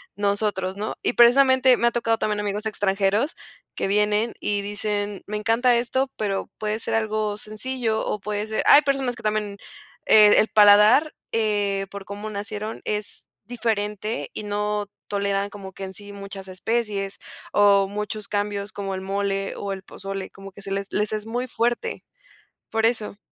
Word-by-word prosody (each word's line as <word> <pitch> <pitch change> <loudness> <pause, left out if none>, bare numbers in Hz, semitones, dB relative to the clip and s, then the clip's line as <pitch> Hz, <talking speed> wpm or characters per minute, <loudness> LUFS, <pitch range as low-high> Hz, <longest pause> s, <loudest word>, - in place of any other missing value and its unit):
nosotros, 200 -2 -1
¿no? 215 +2 -3
Y, - - +1
precisamente, 260 +1 +6
me 235 - +2
ha - - +3
tocado 230 -1 +1
también, 210 -1 -1
amigos 205 +1 -3
extranjeros 205 +5 +1 0.4
que - - -1
vienen, 210 +3 +2
y 205 -1 -1
dicen: 205 0 -3
"Me 210 0 -3
encanta 230 +3 +3
esto", 260 +3 0
pero 200 -2 -2
puede 215 +1 -2
ser - - -3
algo 215 -1 0
sencillo, 220 +1 -1
o 210 - -2
puede 210 +1 -3
ser 220 0 -1
Hay 295 - +9
personas 270 -3 0
que 230 - -13
también, 210 -1 -1 0.5
eh, 210 -1 +7
el 215 - +4
paladar, 210 +9 +6 0.2
eh, 205 -3 0
por 200 -1 -8
cómo 205 +3 -6
nacieron, 210 +1 -5
es 210 0 -4 0.2
diferente, 210 - -2
y 215 - -5
no 210 0 -2 0.2
toleran, 200 0 -1
como 195 -2 -10
que 195 - -8
en 190 0 -6
sí 205 +1 -5
muchas 200 -1 -8
especies, 200 0 -2 0.3
o 200 -1 +5
muchos 210 +1 -4
cambios, 205 0 -2
como 195 -2 -4
el 190 - -5
mole 195 0 -2
o 200 -1 -3
el 190 - -8
pozole. 195 -1 -6
Como 195 0 -12
que 200 - -12
se 195 - -6
les 195 0 -2
les 210 0 +1
es 215 -1 -3
muy 245 +3 -3
fuerte. 240 0 -1 0.7
Por 225 0 +1
eso. 220 -3 -2
210 Hz, 170 wpm, -24 LUFS, 200-220 Hz, 0.7 s, Hay